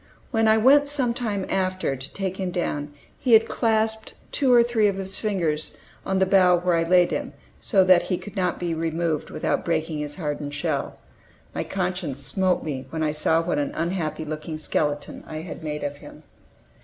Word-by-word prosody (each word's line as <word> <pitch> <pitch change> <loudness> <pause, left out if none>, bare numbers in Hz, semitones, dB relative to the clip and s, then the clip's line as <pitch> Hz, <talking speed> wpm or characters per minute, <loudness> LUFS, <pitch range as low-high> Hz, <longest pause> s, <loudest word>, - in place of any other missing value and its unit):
When 225 -1 +2
I 220 0 +5
went 285 +5 +5
some 265 -5 +2
time 215 -6 -2
after 185 -6 -1
to 130 +1 -9
take 190 -1 -3
him 190 -2 -2
down 150 -5 -2 0.3
he 250 - +2
had 225 0 +7
clasped 220 -1 0
with - - -30
two 270 -3 +2
or 240 -1 +7
three 230 -3 +2
of 200 - 0
his 190 0 -1
fingers 170 -8 -1 0.3
the 190 0 +1
bough 185 -2 +5
where 175 0 +1
I 165 - +2
laid 175 +1 +4
him, - - -3 0.3
so 195 -4 +3
that 185 -1 +6
he 180 - -2
could 205 +3 -10
not 185 -2 0
be 175 -2 -2
removed 165 -1 -1
without - - -1
breaking 160 -2 -1
his 150 0 -4
hardened 145 -4 -4
shell. 145 - -2 0.5
My - - -2
conscience 180 -7 -3
smote 185 +7 +1
me 135 -4 -5
when 160 -1 -3
I 150 - +1
saw 160 +2 +2
what 165 -3 -1
an 145 - -2
unhappy 165 -2 -2
looking 155 +1 -5
skeleton 145 -1 -2
I 155 0 -5
had 165 -1 -8
made 150 -1 -4
of 145 0 -3
him. - - -13
180 Hz, 195 wpm, -24 LUFS, 155-200 Hz, 0.5 s, had